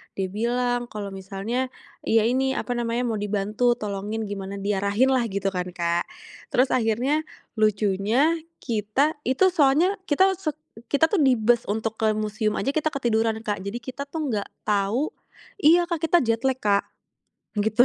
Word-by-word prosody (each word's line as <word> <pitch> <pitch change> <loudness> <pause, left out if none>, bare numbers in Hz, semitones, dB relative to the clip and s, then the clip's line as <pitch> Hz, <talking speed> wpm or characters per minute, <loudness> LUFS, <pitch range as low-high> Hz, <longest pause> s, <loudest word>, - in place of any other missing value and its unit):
Dia 190 -1 -1
bilang 240 +4 0
kalau 210 -1 -5
misalnya, 195 +7 -3 0.3
iya 225 0 +3
ini, 265 +2 +1
apa 245 -2 -2
namanya, 240 +1 -1
mau 225 - -1
dibantu 210 +4 +1
tolongin 210 +1 -3
gimana 195 0 -5
diarahin 200 +5 +1
lah 255 -2 +3
gitu 200 0 -1
kan 180 0 -2
Kak. 170 0 0 0.5
Terus 255 +2 +3
akhirnya 250 +7 +1 0.3
lucunya 215 - +2 0.2
kita 235 +7 0
itu 265 +10 +3
soalnya 315 +6 +4
kita 380 +6 +4
set 310 -5 -3 0.4
kita 310 +3 +4
tuh 400 - +2
di 260 -2 +5
bus 235 +2 +3
untuk 220 +1 -2
ke 220 -1 +3
museum 215 0 -1
aja 275 - 0
kita 310 0 +1
ketiduran 225 -4 0
Kak. 205 -3 -2
Jadi 205 +5 -4
kita 260 +4 -6
tuh 320 +2 -4
nggak 200 - -3 0.2
tahu 210 +8 +1 0.5
iya 340 +3 +6
Kak 340 -3 -2
kita 340 +2 +4
jet 230 +1 0
lag 260 0 0
Kak. 200 -1 +2 0.8
Gitu. 220 +4 +4
225 Hz, 160 wpm, -24 LUFS, 205-265 Hz, 0.8 s, iya